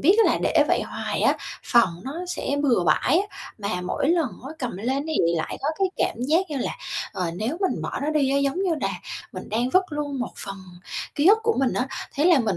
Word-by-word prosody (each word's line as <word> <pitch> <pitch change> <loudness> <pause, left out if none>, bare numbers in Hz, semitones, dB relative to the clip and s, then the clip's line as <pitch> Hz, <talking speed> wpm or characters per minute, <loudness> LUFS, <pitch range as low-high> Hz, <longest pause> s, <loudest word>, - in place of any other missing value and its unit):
biết 370 +8 +5
á - - +4
là - - 0
để - - +4
vậy - - +3
hoài - - -3
á, - - +4 0.3
phòng 185 -9 +3
nó 265 - -4
sẽ 285 -5 -2
bừa 240 -11 +3
bãi 250 - +4
á, 400 - -3 0.3
mà 200 -3 -2
mỗi 180 +9 -1
lần 330 -5 +3 0.2
á - - -6
cầm 250 - -3
lên 260 +8 -1
thì 315 - -2 0.2
lại 160 - -3
có 280 - +1
cái 385 -1 +3
cảm - - 0
giác 335 +4 +2
như 290 - -2
là, - - -1 0.4
ờ, 180 -4 -2
nếu 230 - -2
mình 380 - 0
bỏ - - -3
nó 300 - 0
đi 285 -3 +2
á, 280 - +3
giống 280 +2 +1
như 360 -4 +2
là - - +1 0.4
mình - - -7
đang 240 +4 0
vứt 370 +5 +5
luôn 295 -2 -3
một 250 - -3
phần 195 0 -6 0.6
ký 290 - +2
ức 425 +3 +8
của 455 0 +2
mình 265 - +2
á, 255 +1 -1 0.3
thế 295 - +1
là 345 -5 +6
mình 215 -7 +1
275 Hz, 245 wpm, -24 LUFS, 230-320 Hz, 0.6 s, ức